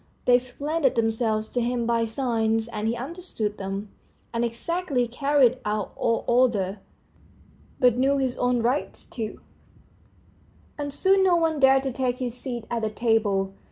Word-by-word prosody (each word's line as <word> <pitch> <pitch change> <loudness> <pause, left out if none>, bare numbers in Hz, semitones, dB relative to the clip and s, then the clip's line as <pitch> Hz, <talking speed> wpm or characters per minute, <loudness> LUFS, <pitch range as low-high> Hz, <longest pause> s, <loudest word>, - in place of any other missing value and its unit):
They 250 - +5
explained 285 +6 -4
themselves 225 -1 0
to 245 - -1
him 240 0 -1
by 230 0 +1
signs, 225 -2 0
and 220 -2 -3
he 230 - 0
understood 250 - -4
them, 195 +1 -5 0.4
and 230 0 0
exactly 255 +2 -1
carried 260 0 +2
out 210 -1 -2
all 230 -1 0
orders, 225 -6 +2 1.0
but 245 -2 +4
knew 275 +2 +3
his 260 -2 0
own 245 -1 +1
rights 250 +5 -1
too, 220 -3 -6 1.3
and 290 -1 -4
soon 385 +6 +3
no 365 -2 +4
one 325 -3 +1
dared 270 0 +5
to 270 - -2
take 250 0 -1
his 250 -3 -3
seat 245 -2 -6
at 235 -1 -1
the 220 - 0
table. 210 -3 +1
240 Hz, 155 wpm, -25 LUFS, 225-270 Hz, 1.3 s, They